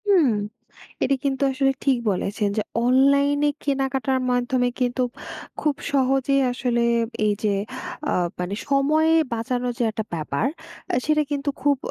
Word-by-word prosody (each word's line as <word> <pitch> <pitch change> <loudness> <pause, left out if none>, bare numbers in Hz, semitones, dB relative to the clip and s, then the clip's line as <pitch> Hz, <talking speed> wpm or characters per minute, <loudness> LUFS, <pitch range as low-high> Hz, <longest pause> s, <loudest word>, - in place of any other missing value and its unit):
হুম। 370 -8 +5 0.8
এটা 275 - +2
কিন্তু 275 -1 -1
আসলে 270 0 +2
ঠিক 270 -3 +3
বলেছেন 205 +2 -1
যে 215 - +1 0.2
অনলাইনে 280 +3 +4 0.2
কেনাকাটার 270 -1 0
মাধ্যমে 245 0 +1
কিন্তু 250 0 +1 0.6
খুব 300 -2 +1 0.2
সহজে 270 0 +2 0.2
আসলে 245 -1 0 0.4
এইযে, 210 0 +1 0.5
অ্যা - - +1 0.2
মানে 180 +2 -3
সময়ে 300 +3 +3 0.2
বাঁচানো 245 +2 -2
যে - - 0
একটা 220 0 -4
ব্যাপার, 155 - -1 0.5
আ - - +2
সেটা 305 0 +3
কিন্তু 285 0 -2
খুব 285 0 +3
265 Hz, 130 wpm, -23 LUFS, 245-280 Hz, 0.8 s, হুম